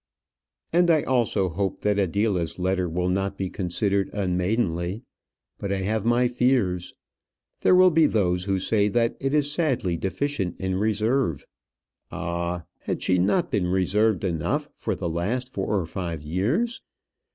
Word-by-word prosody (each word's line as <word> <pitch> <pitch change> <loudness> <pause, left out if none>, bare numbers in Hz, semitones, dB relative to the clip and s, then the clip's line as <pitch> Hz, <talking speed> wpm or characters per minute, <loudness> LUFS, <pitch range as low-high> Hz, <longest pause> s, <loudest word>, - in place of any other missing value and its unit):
And 175 0 +4
I 155 -3 +4
also 115 -6 +1
hope 95 +2 -2
that 105 -1 +1
Adela's 100 -2 0
letter 95 -1 0
will 90 +2 -1
not 95 +2 -1
be 95 -2 -3
considered 95 +1 0
unmaidenly; 90 0 -1 0.6
but 100 - -3
I 95 -1 -1
have 110 +2 -1
my 120 +1 +3
fears. 120 -8 0 0.6
There - - +4
will 185 0 +7
be 160 -1 +5
those 90 -6 +1
who 100 - 0
will 95 - +1
say 105 -2 +2
that 115 +2 +1
it 135 +2 0
is 145 -1 +2
sadly 130 - 0
deficient 100 - -2
in 95 -1 -1
reserve. 110 - 0 0.7
Ah! 85 0 -3 0.2
had - - -4
she 90 -1 +2
not 170 - +1
been 95 -4 +1
reserved 95 +3 +2
enough 85 -5 -1
for - - -3
the - - -3
last 105 +10 -2
four 100 -3 -1
or 90 - -3
five 85 -3 -5
years? 120 - -1
100 Hz, 155 wpm, -25 LUFS, 90-120 Hz, 0.7 s, will